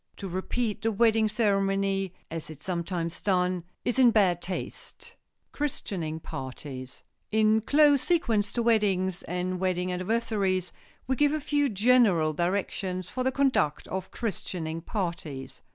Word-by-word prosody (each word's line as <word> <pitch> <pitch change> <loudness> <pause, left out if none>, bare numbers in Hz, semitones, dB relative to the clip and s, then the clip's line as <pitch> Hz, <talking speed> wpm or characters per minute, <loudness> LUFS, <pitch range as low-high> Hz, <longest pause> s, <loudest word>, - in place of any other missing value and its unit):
To 195 - -5
repeat 205 +5 -2
the 225 - +1
wedding 225 0 +3
ceremony, 195 -3 +1 0.2
as 165 -1 -5
is 155 -3 -9
sometimes 170 0 -3
done, 180 -2 +1 0.2
is 245 +2 0
in 250 -2 +8
bad 190 -6 +3
taste. 185 +1 -6
[Sidenote: - - -44
CHRISTENING 180 - -3
PARTIES] 130 -1 -7 0.3
In 220 0 +3
close 290 +2 +5
sequence 225 - +1
to 240 - 0
weddings 195 -5 +2
and 180 +1 -3
wedding 185 -1 0
anniversaries 190 -1 0 0.3
we 260 - 0
give 290 +2 +3
a 310 - 0
few 290 -1 +1
general 205 -7 +4
directions 185 +1 -2
for 255 - -2
the 260 - +2
conduct 260 - +1
of 190 0 -4
christening 165 -7 -4
parties. 170 - -4
195 Hz, 135 wpm, -28 LUFS, 175-225 Hz, 0.3 s, in